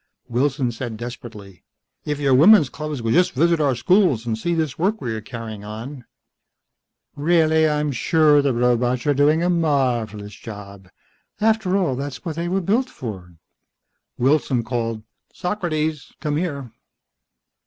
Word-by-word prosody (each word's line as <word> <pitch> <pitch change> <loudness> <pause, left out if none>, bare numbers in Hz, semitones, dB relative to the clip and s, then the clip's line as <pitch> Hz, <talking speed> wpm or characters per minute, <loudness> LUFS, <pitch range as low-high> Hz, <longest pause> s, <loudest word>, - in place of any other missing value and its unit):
Wilson 130 +1 0
said 115 -1 -6
desperately, 110 -6 -9 0.4
"If 150 -1 -2
your 140 -2 +2
women's 155 +2 +7
clubs 150 -5 -5
would 115 - +1
just 180 +1 +3
visit 165 +4 +2
our 140 -3 +2
schools 135 - +2
and 115 -2 -1
see 170 +10 -2
this 155 -4 -2
work 205 +6 +1
we 120 - -3
are 110 - -5
carrying 110 -2 -8
on 115 +5 -8 0.6
..." - - -55
"Reahlly, 160 0 +3
I'm 150 -1 0
sure 150 +2 +3
the 140 -1 +1
robots 125 0 +1
are 145 - +3
doing 150 +4 +3
a 175 - +1
marvelous 120 - 0
job. 100 -3 -10 0.5
After 215 -3 +2
all, 175 -10 0
that's 140 +3 -6
what 165 -3 -3
they 170 +1 -3
were 190 +2 0
built 230 +8 +1
for." 95 -8 -8 0.8
Wilson 130 -2 +1
called, 115 -2 -3 0.3
"Socrates! 160 -6 -2
Come 150 0 -2
here!" 140 -8 -4
140 Hz, 150 wpm, -21 LUFS, 115-160 Hz, 0.8 s, women's